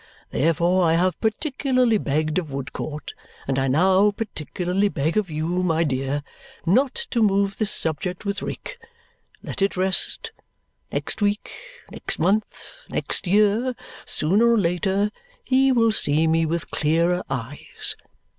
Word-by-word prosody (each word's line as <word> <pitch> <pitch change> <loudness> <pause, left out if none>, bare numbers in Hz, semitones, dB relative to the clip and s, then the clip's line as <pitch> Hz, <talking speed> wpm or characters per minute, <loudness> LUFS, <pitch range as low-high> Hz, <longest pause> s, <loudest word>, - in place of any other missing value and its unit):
Therefore 170 +4 +2
I 165 -1 +3
have 180 +2 +1
particularly 255 -1 +1
begged 155 +3 0
of 160 -5 -7
Woodcourt, 140 +2 -5 0.3
and 135 -1 0
I 135 - +1
now 185 +8 +4
particularly 195 -1 -2
beg 155 -1 -1
of 210 -4 +1
you, 155 0 -3 0.2
my 165 -2 +2
dear, 135 0 -1 0.4
not 250 +10 +3 0.2
to 235 - +1
move 200 -1 +2
this 215 -2 +1
subject 175 +4 -1
with 200 -1 -2
Rick. - - -6 0.6
Let - - -6
it 195 -1 +1
rest. 190 - +1 0.6
Next - - -2
week, 205 +1 0 0.4
next - - -4
month, 210 - -1
next 200 - -1
year, 210 +6 +3 0.3
sooner 205 +9 +3
or 230 - +4
later, 190 +2 +1 0.3
he 265 +1 +3
will 230 -3 +4
see 155 -6 +2
me 160 0 +2
with 170 +1 -3
clearer 170 +4 +1
eyes. 135 +1 -3
185 Hz, 135 wpm, -23 LUFS, 160-210 Hz, 0.6 s, now